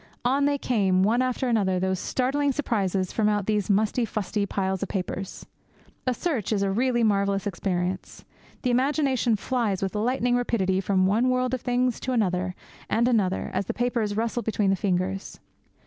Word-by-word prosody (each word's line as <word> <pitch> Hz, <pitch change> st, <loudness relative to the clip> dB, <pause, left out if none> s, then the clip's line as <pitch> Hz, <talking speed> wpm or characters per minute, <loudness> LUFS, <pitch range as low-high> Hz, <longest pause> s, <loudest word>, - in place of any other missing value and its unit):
On 275 Hz, +3 st, +3 dB
they 285 Hz, 0 st, +2 dB
came, 195 Hz, -8 st, +2 dB
one 230 Hz, +5 st, +3 dB
after 255 Hz, 0 st, -1 dB
another, 195 Hz, -6 st, +1 dB
these 190 Hz, 0 st, 0 dB
startling 275 Hz, +6 st, 0 dB
surprises 195 Hz, -9 st, -1 dB
from 215 Hz, -1 st, +1 dB
out 205 Hz, -2 st, 0 dB
these 210 Hz, -2 st, 0 dB
musty 215 Hz, +4 st, +2 dB
fusty 210 Hz, -2 st, -2 dB
piles 190 Hz, -1 st, -1 dB
of 200 Hz, -, -3 dB
papers. 190 Hz, 0 st, -4 dB, 0.6 s
A 255 Hz, -, +3 dB
search 270 Hz, -, -2 dB
is 200 Hz, -2 st, +1 dB
really 240 Hz, +5 st, +1 dB
a -, -, +4 dB
marvellous 200 Hz, -1 st, +1 dB
experience. 180 Hz, -1 st, -3 dB, 0.4 s
The 250 Hz, -, +2 dB
imagination 260 Hz, -2 st, +2 dB
flies 215 Hz, -4 st, -1 dB
with 195 Hz, -, -2 dB
lightning 245 Hz, +3 st, +1 dB
rapidity 195 Hz, -6 st, +1 dB
from 190 Hz, -1 st, +2 dB
one 225 Hz, +6 st, +2 dB
world 255 Hz, 0 st, +1 dB
of 255 Hz, -, -1 dB
things 250 Hz, -1 st, 0 dB
to 260 Hz, -, -2 dB
another 185 Hz, -5 st, 0 dB, 0.3 s
and 235 Hz, +2 st, +2 dB
another 205 Hz, -6 st, +1 dB
as 190 Hz, +1 st, -1 dB
the -, -, -3 dB
papers 235 Hz, -4 st, -1 dB
rustle 230 Hz, +2 st, -1 dB
between 210 Hz, -3 st, +1 dB
the -, -, +3 dB
fingers. 190 Hz, 0 st, -2 dB
215 Hz, 175 wpm, -26 LUFS, 195-245 Hz, 0.6 s, a